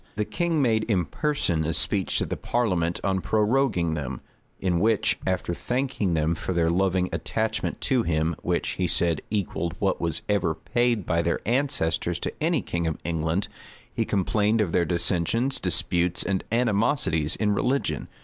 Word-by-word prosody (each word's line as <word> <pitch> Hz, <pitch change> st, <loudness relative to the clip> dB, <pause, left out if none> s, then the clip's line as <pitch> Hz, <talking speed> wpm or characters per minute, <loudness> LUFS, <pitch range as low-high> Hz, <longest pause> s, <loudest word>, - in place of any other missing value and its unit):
The 105 Hz, 0 st, -1 dB
king 165 Hz, 0 st, 0 dB
made 110 Hz, -3 st, +2 dB
in 95 Hz, -6 st, +1 dB
person 90 Hz, -, 0 dB
a 80 Hz, +1 st, 0 dB
speech 95 Hz, +2 st, +1 dB
to -, -, +1 dB
the -, -, -3 dB
parliament 90 Hz, -8 st, 0 dB
on 95 Hz, -1 st, 0 dB
proroguing 105 Hz, -6 st, +1 dB
them; 65 Hz, -5 st, -4 dB, 0.4 s
in 90 Hz, -2 st, +1 dB
which, 110 Hz, +2 st, +2 dB
after 95 Hz, -2 st, 0 dB
thanking 125 Hz, -5 st, -1 dB
them 80 Hz, +1 st, +1 dB
for 90 Hz, +2 st, -3 dB
their 85 Hz, -1 st, +2 dB
loving 95 Hz, 0 st, +1 dB
attachment 110 Hz, +7 st, -2 dB
to 130 Hz, -2 st, +2 dB
him, 80 Hz, -4 st, 0 dB
which, -, -, -1 dB
he 90 Hz, -, -1 dB
said, 85 Hz, -2 st, +2 dB
equalled 90 Hz, -5 st, -2 dB
what 100 Hz, -2 st, 0 dB
was 85 Hz, -1 st, -1 dB
ever 95 Hz, -6 st, +1 dB
paid 120 Hz, -2 st, 0 dB
by 85 Hz, 0 st, +1 dB
their 85 Hz, 0 st, 0 dB
ancestors 105 Hz, -, 0 dB
to -, -, -4 dB
any 165 Hz, +2 st, +1 dB
king 85 Hz, -1 st, -2 dB
of 80 Hz, -, -2 dB
England, 80 Hz, +3 st, -1 dB, 0.5 s
he -, -, 0 dB
complained 105 Hz, +3 st, +1 dB
of 100 Hz, -6 st, +1 dB
their 85 Hz, -, +2 dB
dissensions, 90 Hz, -, +1 dB
disputes, 90 Hz, 0 st, 0 dB
and 95 Hz, 0 st, -1 dB
animosities 110 Hz, -, +1 dB
in 105 Hz, -1 st, +1 dB
religion. 130 Hz, +7 st, 0 dB
95 Hz, 165 wpm, -25 LUFS, 85-110 Hz, 0.5 s, made